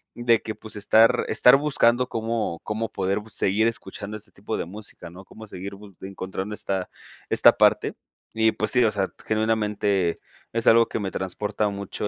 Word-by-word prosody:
de 120 -1 +2
que 110 - -6
pues 110 - -11
estar 110 +4 +4
estar 125 - +6
buscando 125 -4 +2
cómo 110 -6 -2
cómo 110 +1 -3
poder 95 +2 -1
bu 110 - -13
seguir 105 +1 +1
escuchando 105 -2 -5
este 110 - -18
tipo 105 +2 -5
de - - -3
música, 95 -3 -10
¿no? 95 +3 -13
cómo 110 0 -12
seguir 100 +1 -8
bus 100 -2 -15
encontrando 95 +1 -6
esta 95 -2 -3 0.4
esta - - +6
parte, - - +3 0.4
y 110 0 +3
pues 110 +3 0
sí, 125 -2 +5
o 110 - +2
sea, 100 -2 -2
genuinamente 105 -4 0 0.3
es 115 -1 -2
algo 115 0 +6
que - - -4
me 100 -2 -3
transporta 105 +3 -2
mucho, 100 +1 -5
105 Hz, 180 wpm, -24 LUFS, 100-115 Hz, 0.4 s, estar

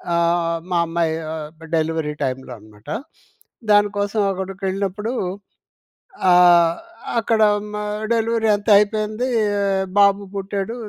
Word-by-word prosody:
ఆహ్, 170 0 +1
మా 175 - +2
అమ్మాయి 165 -1 0 0.2
ఆహ్, 155 -1 -6 0.3
డెలివరీ 160 -1 -1
టైమ్‌లో 130 0 -4
అన్నమాట. 105 0 -19 0.8
దానికోసం 205 0 +2
అక్కడికెళ్ళినప్పుడు, 195 +3 -3 1.2
ఆహ్, 175 -1 +6 0.4
అక్కడ 225 -1 +1 0.3
మా 210 - -3 0.3
డెలివరీ 225 -1 +1
అంతా 205 +2 -1
అయిపోయిందీ. 215 +3 -1 0.7
బాబు 200 0 +4
పుట్టాడు, 195 +3 -3
195 Hz, 95 wpm, -20 LUFS, 165-210 Hz, 1.2 s, ఆహ్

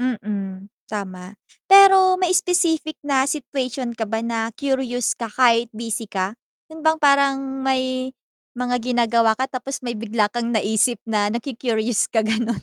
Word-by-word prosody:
Mm, 205 -5 -4 0.2
tama. 190 -2 -7 0.3
Pero 385 -1 +7
may 365 -1 +1
specific 335 -4 +1
na 275 -1 +1
situation 260 -4 -3
ka 225 -2 -4
ba 225 +1 -2
na 225 -1 -2
curious 265 -4 -1
ka 230 - -6
kahit 235 0 +3
busy 225 -1 -4
ka, 190 0 -2 0.4
yun 320 - -10
bang 315 0 +2
parang 275 -2 +2
may 260 -1 -1 0.4
mga 245 0 -1
ginagawa 235 -2 +2
ka 260 +2 -2
tapos 265 +1 -5
may 240 - -2
bigla 215 -1 0
kang 240 0 -2
naisip 220 +2 +1
na 210 -2 +1
naku-curious 235 -2 -1
ka 225 - +1
gano'n? 225 +1 -1
240 Hz, 145 wpm, -21 LUFS, 225-270 Hz, 0.4 s, Pero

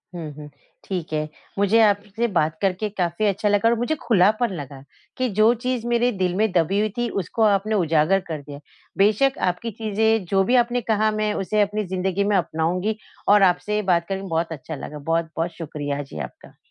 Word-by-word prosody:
हुँ, 160 -3 -6
हुँ 150 0 -10 0.3
ठीक 180 -5 -4
है। 155 0 -1 0.3
मुझे 205 +3 +4
आपसे 210 +2 +1
बात 155 0 +1
करके 195 +2 0
काफ़ी 180 0 -1
अच्छा 200 +1 0
लगा 205 +2 +3
और 235 - +3
मुझे 245 +7 0
खुलापन 215 +1 +3
लगा 140 -3 -8 0.4
कि 255 - +1
जो 220 +2 +6
चीज़ 250 -2 -1
मेरे 240 +1 +2
दिल 180 -1 +1
में 215 +1 +1
दबी 180 +3 +2
हुई 215 +1 +1
थी 240 0 0
उसको 185 +6 -5
आपने 210 +1 +2
उजागर 165 0 +3
कर 155 -3 -4
दिया। 145 0 -10 0.4
बेशक 215 +8 +3
आपकी 205 +6 -4
चीज़ें 220 0 +1
जो 195 -1 +3
भी 245 +6 +2
आपने 245 +1 -2
कहा 215 -1 +1
मैं 215 0 -1
उसे 210 +2 0
अपनी 210 +1 0
ज़िंदगी 190 +1 -1
में 205 0 +1
अपनाऊँगी 180 +5 -1 0.3
और 205 0 +6
आपसे 195 +3 +2
बात 170 -1 +2
करके 195 0 -3
बहुत 165 -1 -1
अच्छा 160 +1 -6
लगा। 150 +1 -8
बहुत-बहुत 165 +2 -1
शुक्रिया 145 -3 -4
जी 135 - -9
आपका। - - -9
195 Hz, 190 wpm, -23 LUFS, 165-215 Hz, 0.4 s, जो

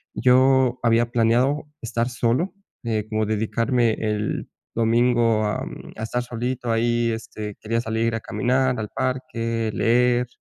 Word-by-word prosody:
yo 130 0 +4
había 115 0 +3
planeado 125 +5 +2
estar 120 +1 -1
solo, 125 +10 0 0.3
eh, 110 -2 -1
como 110 -1 0
dedicarme, 115 +2 +1
el 105 -1 -2 0.3
domingo, 115 -1 +3
a, 105 - -1
mm, - - -10
a 110 - -5
estar 120 +2 -2
solito 120 0 -3
ahí, 120 0 +1
este, 110 -2 -6
quería 115 +1 -1
salir 115 0 -1
a - - -2
caminar 125 +2 0
al 105 - -4
parque, 115 -3 -2
leer, 125 +1 +2
115 Hz, 140 wpm, -23 LUFS, 115-125 Hz, 0.3 s, yo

